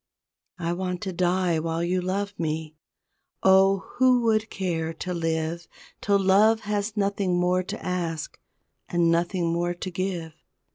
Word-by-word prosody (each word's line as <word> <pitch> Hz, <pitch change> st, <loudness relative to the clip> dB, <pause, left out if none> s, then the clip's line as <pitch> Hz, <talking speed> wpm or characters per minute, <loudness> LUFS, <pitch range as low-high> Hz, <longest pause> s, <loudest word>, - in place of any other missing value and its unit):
I 170 Hz, -1 st, -2 dB
want 180 Hz, 0 st, -3 dB
to 190 Hz, -2 st, -4 dB
die 180 Hz, -1 st, +1 dB
while 165 Hz, +1 st, -2 dB
you 180 Hz, +1 st, 0 dB
love 200 Hz, +2 st, -2 dB
me 155 Hz, -1 st, -3 dB, 0.7 s
Oh, 190 Hz, 0 st, +5 dB
who 255 Hz, -1 st, +5 dB
would 220 Hz, -1 st, +1 dB
care 165 Hz, -4 st, -2 dB
to 180 Hz, +3 st, -4 dB
live 165 Hz, 0 st, -2 dB, 0.3 s
Till 200 Hz, 0 st, +3 dB
love 205 Hz, +4 st, +4 dB
has 210 Hz, +1 st, -2 dB
nothing 200 Hz, -3 st, +1 dB
more 180 Hz, +1 st, +2 dB
to 185 Hz, -, -7 dB
ask 170 Hz, -4 st, -3 dB, 0.5 s
And 170 Hz, -1 st, +2 dB
nothing 170 Hz, 0 st, 0 dB
more 175 Hz, +1 st, -1 dB
to 185 Hz, +1 st, -5 dB
give! 175 Hz, -3 st, -3 dB
180 Hz, 145 wpm, -25 LUFS, 170-195 Hz, 0.7 s, Oh